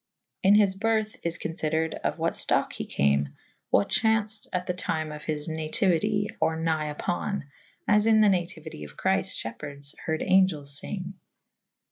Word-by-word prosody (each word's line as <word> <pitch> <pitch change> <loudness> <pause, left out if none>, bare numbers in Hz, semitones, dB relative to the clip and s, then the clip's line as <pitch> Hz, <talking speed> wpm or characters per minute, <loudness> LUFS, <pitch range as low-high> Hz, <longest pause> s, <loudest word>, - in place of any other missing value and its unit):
In 195 +2 +6
his 200 -2 +5
byrthe 220 +1 0
is 170 0 -1
confydered 160 -1 -1
of - - -2
what - - 0
ftocke - - +1
he - - -5
came 70 0 +1 0.2
/ - - -43
what 100 - +2
chaunfed 220 -1 +1
at 180 0 -2
the 180 - -1
tyme 155 -3 -2
of 150 0 -8
his 150 0 -2
natiuite 185 +6 0
or 160 - +1
nighe 155 -2 -1
vpo« 200 +2 -2 0.2
/ - - -34
as 210 +1 +4
Mn 220 -1 +6
the 210 - +6
natiuite 170 - -2
of 75 - -11
Chryfte - - 0 0.3
fhepeherdes 140 0 -8
harde 160 -1 0
angelles 155 -7 +3
fynge. 185 -1 -5
170 Hz, 165 wpm, -27 LUFS, 155-205 Hz, 0.3 s, In